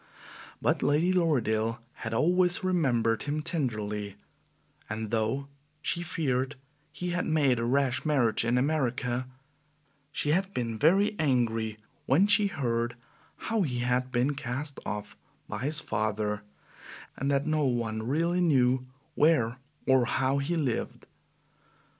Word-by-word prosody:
But - - +1
Lady 160 +6 +3
Lorridaile 115 - +1 0.2
had 115 - -6
always 180 - +2
remembered 125 -11 +2
him 150 +1 -2
tenderly, 105 - -2 0.7
and 110 0 -4
though 115 +5 0 0.4
she 170 - -1
feared 140 -5 -1 0.4
he 180 0 -4
had 175 - -1
made 140 -6 +3
a 115 - -1
rash 130 +1 +1
marriage 135 -9 +2
in 120 +1 +2
America, 125 -3 0 0.8
she 145 - 0
had 190 +4 0
been 115 -2 -1
very 195 +7 +4
angry 115 -6 +1 0.3
when 155 +10 +5
she 205 0 +4
heard 120 -8 -1 0.4
how 225 -1 -1
he 130 -9 -1
had 125 +1 0
been 125 +4 +1
cast 140 +2 -5
off 105 +1 -5 0.3
by 110 - -5
his 145 +6 -1
father 105 -3 -1 0.7
and 135 - -2
that 140 0 +1
no 155 -1 +1
one 115 -4 -1
really 165 +9 +1
knew 130 -5 +3 0.3
where 145 -7 +3 0.3
or 130 -2 +4
how 135 +2 +1
he 150 +5 -1
lived. 140 -8 -2
130 Hz, 130 wpm, -29 LUFS, 115-155 Hz, 0.8 s, when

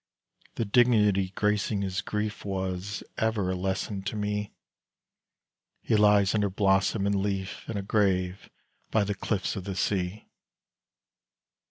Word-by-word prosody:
The 115 - -1
dignity 105 -4 +4
gracing 105 -1 +1
his 95 0 -2
grief 105 +1 -3
Was 95 +1 -3 0.2
ever 110 -4 +1
a - - -1
lesson 95 +2 -2
to 105 - -3
me; 105 0 -2 1.3
He - - +1
lies 105 -2 +5
under 105 -2 +2
blossom 95 +1 +2
and 100 - +2
leaf 95 -1 -2
In 110 - -2
a 100 - -3
grave 95 -3 0 0.4
by 110 - +2
the 100 +1 -1
cliffs 100 0 -2
of 95 - -5
the 100 -2 -4
sea. 95 +2 -1
100 Hz, 135 wpm, -28 LUFS, 95-105 Hz, 1.3 s, lies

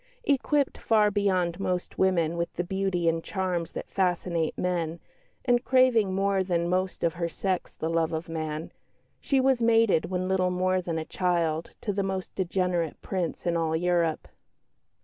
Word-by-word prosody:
Equipped 285 - +1
far 210 -2 +3
beyond 185 -4 +1
most 180 -2 -3
women 170 -4 +2
with 170 0 -2
the 175 - -1
beauty 190 -2 -1
and 165 0 +1
charms 180 -4 -2
that - - -5
fascinate 175 -3 0
men, 170 -2 -1 0.5
and 245 -1 +3
craving 255 -6 +4
more 195 0 +1
than 170 -2 0
most 185 +1 -1
of 165 -1 +2
her 170 -1 -2
sex 185 +1 -2
the 160 - -3
love 165 -1 +1
of 160 +1 -3
man, 155 -1 -4 0.5
she 275 - +1
was 260 -2 +3
mated 225 -7 +4
when 185 0 -2
little 185 -1 +2
more 185 +1 +1
than 170 -2 -3
a 160 - -3
child 170 -3 0
to 205 - -2
the 200 - 0
most 190 -1 -3
degenerate 180 -3 -1
Prince 180 -4 -3
in 170 -1 +1
all 160 -1 0
Europe. 170 -1 +1
180 Hz, 170 wpm, -27 LUFS, 170-195 Hz, 0.5 s, craving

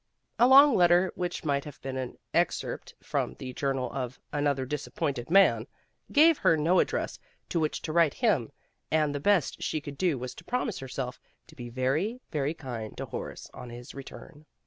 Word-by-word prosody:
A 240 - +7
long 275 +2 +8
let 175 -1 +6
ter 175 +2 +4
which 180 -1 -3
might 140 -2 +1
have 150 - -10
been 135 0 -4
an 130 -1 -4 0.2
excerpt - - -1
from - - -2
the 130 -1 -7
Journal 135 -2 -1
of 130 -1 -4
Another 145 -2 +1
Disappointed 140 -2 -3
Man 160 - +5 0.4
gave 315 +1 +6
her 165 - +4
no 165 +5 +3
address - - -1 0.3
to 170 - 0
which 155 -1 -1
to 155 - -3
write 165 -3 +4
him, 195 - +1 0.4
and 155 -2 +2
the 145 - -2
best 180 -1 +2
she 155 - -1
could 145 -1 -9
do 175 -7 +2
was 125 0 -5
to 160 - -13
promise 245 0 -2
herself 130 -1 -5 0.3
to - - -17
be 120 -1 -7
very, 140 - 0
very 150 0 -1
kind 120 -8 -6
to - - -4
Horace - - -7
on 125 - -9
his 120 +1 -9
return. 145 +3 -11
145 Hz, 190 wpm, -28 LUFS, 130-175 Hz, 0.4 s, long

